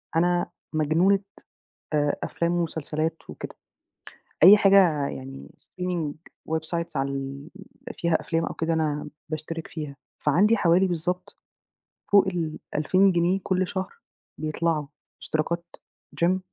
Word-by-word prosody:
أنا 175 +1 +2 0.3
مجنونة 160 +6 +3 0.7
آآ 145 -1 +2
أفلام 170 0 -1
ومسلسلات 160 -1 -1
وكده، 75 - -8 0.9
أي 195 +5 +11
حاجة 185 -8 +5
يعني 135 0 -8
streaming 180 -5 -3 0.4
websites 165 +1 -3
عال 140 +1 -3 0.4
فيها 170 -2 0
أفلام 165 0 -1
أو - - -4
كده 165 +1 -1
أنا 150 -2 -1 0.2
باشترك 160 +1 -5
فيها، 150 -3 -6 0.2
فعندي 200 +10 +4
حوالي 180 0 +4
بالضبط 180 +1 -3 0.7
فوق 200 -1 +6
ال2000 175 +1 +1
جنيه 175 +2 +2
كلّ 185 -1 +1
شهر 190 0 -4 0.5
بيطلعوا، 155 0 0 0.4
اشتراكات 170 +2 -1 0.6
Gym، 185 +2 +3
165 Hz, 110 wpm, -25 LUFS, 155-180 Hz, 0.9 s, أي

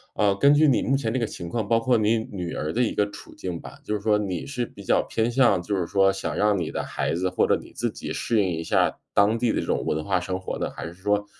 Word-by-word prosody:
呃， 105 -2 +3
根 140 +6 +6
据 150 +1 +5
你 135 - +3
目 135 - +2
前 125 -5 -1
这 130 - 0
个 115 - +1
情 85 -5 -7
况， 110 -1 -2
包 115 +1 +3
括 120 +2 +2
你 110 +1 +2
女 90 -4 -4
儿 75 - -2
的 120 - 0
一 115 - 0
个 105 0 +1
处 - - -12
境 90 -3 -5
吧， - - -11
就 105 - -3
是 105 - -2
说 105 0 +3
你 95 -5 -3
是 125 -3 -3
比 100 - -13
较 - - +3
偏 115 +1 -1
向， 120 -8 +4
就 100 +4 -2
是 90 -3 -1
说 95 0 +3
想 95 - -4
让 105 -1 +2
你 85 -3 -2
的 - - -3
孩 - - -2
子 95 +2 0
或 90 - +1
者 - - +4
你 - - -13
自 - - -1
己 - - -6
适 115 -3 +1
应 95 - +1
一 80 -1 -3
下 - - +1 0.2
当 105 +3 +4
地 120 -1 +2
的 - - 0
这 - - -3
种 - - 0
文 75 0 -1
化 95 -2 +1
生 95 +1 -3
活 95 - -5
呢， - - -1
还 - - -7
是 85 - -9
说 105 +2 0
105 Hz, 320 characters per minute, -25 LUFS, 90-115 Hz, 0.2 s, 根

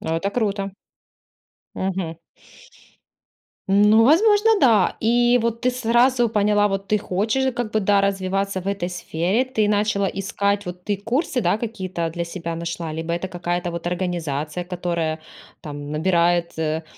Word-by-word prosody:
Ну, 160 - -2
это 195 +4 -1
круто. 205 -3 -1
Мгм. 195 - -7 1.0
Мгм. 185 -3 -3 1.5
Ну, 210 +3 +5
возможно, 415 - +5
да. 230 -6 +4
И 240 +2 +3
вот 230 0 -1
ты 250 - +2
сразу 245 0 +3
поняла, 210 -1 +2
вот 195 0 -3
ты 215 - +2
хочешь 220 +8 0
как 235 -2 -4
бы, 215 - +2
да, 200 0 +3
развиваться 195 0 -1
в 190 - -5
этой 200 -3 -2
сфере. 180 +5 -1
Ты 255 -5 0
начала 205 -1 +1
искать, 200 +1 -1
вот 180 0 -7
ты 205 -1 -1
курсы, 250 - -1
да, 190 +2 +1
какие-то 185 -7 -3
для 170 +1 -3
себя 170 -1 -5
нашла? 170 -1 -4
Либо 160 +1 -4
это 175 +2 -2
какая-то 175 -1 -3
вот 170 0 -4
организация, 170 -3 -3
которая 170 -3 -2 0.4
там 145 -1 -7
набирает, 170 +1 +1
э, 160 0 -1
195 Hz, 150 wpm, -22 LUFS, 175-220 Hz, 1.5 s, Ну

